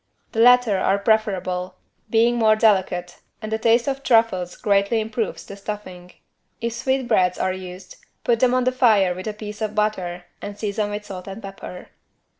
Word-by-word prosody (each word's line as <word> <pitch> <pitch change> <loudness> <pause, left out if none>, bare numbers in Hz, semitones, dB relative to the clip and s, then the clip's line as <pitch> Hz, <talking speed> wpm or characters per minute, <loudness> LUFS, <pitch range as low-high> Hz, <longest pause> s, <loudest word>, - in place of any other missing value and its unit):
The 225 - -3
latter 245 -4 +5
are 190 +1 +2
preferable, 190 -4 0 0.3
being 230 +2 +3
more 220 -2 +4
delicate 190 -5 +1 0.2
and 215 0 -5
a 220 - 0
taste 235 +2 +3
of 275 0 -2
truffles 225 -9 +2
greatly 200 +2 +2
improves 220 +1 -3
the 200 - -9
stuffing. 195 -3 -8 0.5
If 235 0 -2
sweetbreads 235 -7 +1
are 185 - 0
used, 185 0 -9 0.3
put 235 -1 +2
them 255 0 +3
on 255 - +2
the 255 - +2
fire 215 -8 +3
with 185 +3 -7
a 215 - -2
piece 210 0 -8
of 215 -1 -2
butter 185 -5 -1 0.2
and 205 0 -7
season 210 0 -2
with 205 0 -5
salt 185 -2 -8
and 195 +2 -7
pepper. 195 -3 -9
210 Hz, 175 wpm, -22 LUFS, 185-225 Hz, 0.5 s, latter